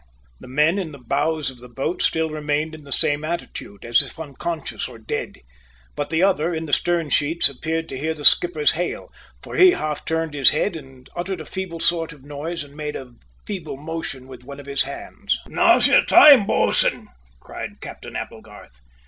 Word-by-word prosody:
The - - -12
men 150 +8 +2
in 165 -6 -5
the - - -9
bows 145 +3 -1
of 125 - -16
the 125 +1 -13
boat 135 +8 -3
still 160 -1 +1
remained 150 +1 -2
in 155 -2 -11
the 140 - -12
same 145 +2 +1
attitude, 155 -10 -6
as 120 0 +5
if - - -9
unconscious 160 +2 -5
or - - -12
dead; 110 -1 -5 0.5
but 145 - -3
the 165 +2 +1
other 175 -4 +2
in 160 0 -4
the 145 - -7
stern 170 -2 +1
sheets 160 +4 +3
appeared 160 +4 -3
to 135 - -5
hear 160 +2 -2
the 145 -2 -7
skipper's 155 -4 +6
hail, 175 +2 -4 0.3
for - - -7
he 370 -1 +7
half 155 -1 -3
turned 160 -1 -2
his 140 -3 +6
head 200 - -1
and 135 -4 -12
uttered 180 +1 -4
a 155 - -8
feeble 185 -2 -6
sort 165 -1 0
of 140 -3 -18
noise 150 +4 -5
and 145 0 -16
made 150 -1 -5
a 125 -2 -8 0.3
feeble 175 -9 -6
motion 155 -3 -6
with 130 -2 -12
one 140 +2 -10
of 140 - -11
his 140 0 0
hands. 140 - -4
"Now's - - +4
your - - +5
time, 275 -9 +8
bo'sun!" - - +1 0.3
cried - - -8
Captain - - -10
Applegarth. - - -9
155 Hz, 195 wpm, -22 LUFS, 140-165 Hz, 0.5 s, time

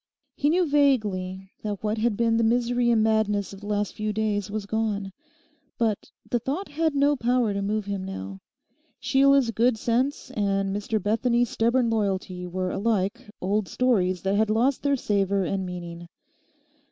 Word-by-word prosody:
He 290 - +1
knew 355 +3 +3
vaguely 205 -10 +1
that 210 -2 -4
what 215 +1 -1
had 220 -2 +1
been 230 -1 +2
the 230 - +2
misery 240 +1 +2
and 225 -2 +4
madness 210 -3 +1
of 195 - -10
the 205 - -8
last 205 -1 -1
few 215 0 -2
days 210 -1 -1
was 210 0 -4
gone. 205 -2 -2 0.7
But 220 -3 -1 0.2
the 240 - 0
thought 285 - -3
had 315 +1 0
no 285 +1 +3
power 245 -3 +1
to 200 - -2
move 210 +1 -1
him 200 -2 -3
now. 95 - -6 0.6
Sheila's 275 -2 +4
good 235 +1 +2
sense, 250 +6 -1
and 195 -1 0
Mr 210 +1 -1
Bethany's 235 +4 +1
stubborn 235 +1 +2
loyalty 190 -4 -2
were 185 +1 -2
alike 205 -2 -1
old 200 +2 0
stories 185 -5 +1
that 195 0 +1
had 215 +1 +2
lost 245 +5 +2
their 280 -1 +2
savour 200 -5 0
and 190 +1 -2
meaning. 175 -1 -7
215 Hz, 165 wpm, -25 LUFS, 195-240 Hz, 0.7 s, and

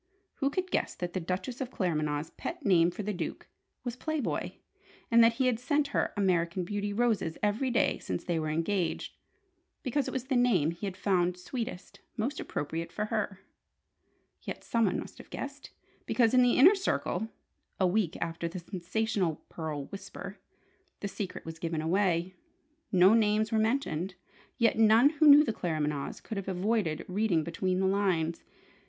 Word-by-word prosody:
Who 275 - +1
could 370 +5 -3
guess - - 0
that 175 -1 -4
the 185 - -1
Duchess 185 +9 -4
of 255 - -2
Claremanagh's 155 - -1
pet 335 -3 -6
name 175 -4 +5
for 210 +4 -6
the 210 +1 -2
Duke 180 - -5 0.4
was 245 -2 -3
"Play 315 +4 -2
Boy," 270 - -3 0.5
and 230 0 +7
that 230 0 +5
he 260 +3 0
had 245 -3 +2
sent 285 +3 +1
her - - 0
"American 180 -2 +1
Beauty" 205 +2 -2
roses 215 -7 0
every 215 +6 +1
day 235 - +2
since 90 - -4
they 170 -2 -1
were 155 -1 -2
engaged, 165 +3 -1 0.7
because 275 +1 0
it - - -3
was 260 - -2
the 265 0 -1
name 210 -11 +3
he 170 +4 -5
had 185 -1 -6
found 180 -3 +1
sweetest, 225 +1 -6 0.2
most 250 +7 -2
appropriate 165 +3 -4
for 210 - -2
her? 205 -3 -2 1.0
Yet, - - -6
someone 225 -5 +1
must - - -9
have - - -12
guessed: 280 +1 -7 0.4
because 235 -2 +3
in 255 - +6
the 245 -1 +4
Inner 340 +10 +8
Circle 380 - -1 0.5
(a 190 - +4
week 185 -2 +1
after 165 0 -3
the 170 - -6
sensational 180 -1 -2
pearl 155 -4 -4
"Whisper") 195 - -8 0.6
the 200 - -2
secret 195 -1 -6
was 165 0 -7
given 165 -2 -2
away. 175 +1 +1 0.6
No 185 +2 +6
names 215 -1 +3
were 220 - +2
mentioned: 215 - 0 0.4
yet 230 -3 +3
none 225 +5 +6
who 310 0 +3
knew 290 +1 +10
the 225 - -1
Claremanaghs 150 -6 -2
could 220 - -5
have 195 - -4
avoided 190 -3 0
reading 185 -4 +1
between 180 +3 -1
the 190 - +2
lines. 185 -4 +1
200 Hz, 170 wpm, -30 LUFS, 170-235 Hz, 1.0 s, knew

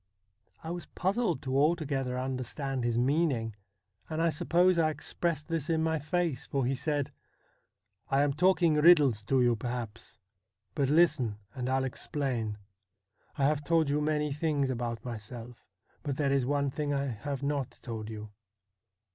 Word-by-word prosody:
I 165 - -4
was 175 0 -5
puzzled 190 - 0
to 130 0 -2
altogether 140 -4 +1
understand 130 +1 -3
his 120 -1 0
meaning, 125 -4 +1 0.5
and 160 0 -3
I 165 0 +3
suppose 175 +3 +3
I 160 -1 +4
expressed 155 0 -2
this 165 -3 -2
in 160 -1 +2
my 160 -1 +1
face, 150 -2 -1
for 135 -3 0
he 130 - +1
said: 145 +1 -1 0.5
' - - -51 0.2
I 135 +1 +3
am 145 -1 +1
talking 175 0 +4
riddles 150 - +5
to 130 +2 +3
you, 120 -1 +4
perhaps; 115 -1 -6 0.6
but 140 -2 +1
listen, 150 -9 +3 0.2
and 125 0 -3
I'll 130 0 +2
explain. 125 -5 -2 0.8
I 140 - +2
have 150 0 +1
told 160 -1 +2
you 150 +1 +1
many 150 -1 0
things 145 -3 0
about 120 -2 -3
myself, 120 +1 -8 0.3
but 140 -3 -3
there 140 -2 +1
is 135 -2 +2
one 140 -1 +1
thing 145 +1 -2
I 140 0 0
have 135 +3 -4
not 140 -3 -2
told 110 -3 -5
you. 105 -1 -7
140 Hz, 160 wpm, -30 LUFS, 125-155 Hz, 0.8 s, riddles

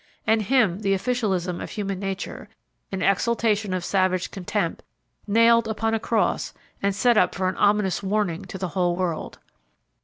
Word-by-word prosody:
And 220 0 +3
Him 215 -5 +2
the 195 -2 +1
officialism 190 -6 -1
of - - -6
human 195 -3 -3
nature, 195 -1 -5 0.4
in 190 0 -2
exaltation 215 0 +1
of 185 -2 -2
savage 185 -2 +1
contempt, 190 -3 -2 0.5
nailed 230 +2 +4
upon 225 0 -1
a 225 - +1
cross, 225 0 0 0.3
and 200 -1 0
set 235 +3 +3
up 180 - +3
for 185 +1 0
an 185 - -2
ominous 205 -2 +2
warning 200 -3 -1
to 190 - -7
the 185 -1 -3
whole 175 -1 0
world. 175 -3 -3
195 Hz, 160 wpm, -24 LUFS, 185-220 Hz, 0.5 s, nailed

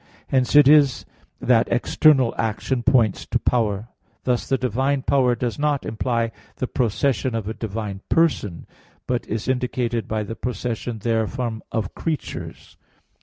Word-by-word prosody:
Hence 130 +1 +1
it 145 -2 +8
is 145 -3 +5 0.3
that 120 -3 +3
external 130 +1 +4
action 115 +3 -1
points 115 -4 +2
to - - +1
power. 110 -2 0 0.3
Thus 125 -1 -1
the 135 - +2
divine 130 +3 0
power 130 -4 +3
does 120 +2 -3
not 145 -2 0
imply 115 0 -1 0.2
the - - -2
procession 125 +1 0
of 110 -3 -3
a 110 - -2
divine 105 -3 -5
person; 150 - +1 0.4
but 125 -1 -2
is 110 0 -3
indicated 125 -2 -1
by 110 -1 -1
the 115 +2 -6
procession 120 0 -4
therefrom 115 +1 -1
of 110 -4 -2
creatures. 160 -3 -5
120 Hz, 140 wpm, -22 LUFS, 110-130 Hz, 0.4 s, it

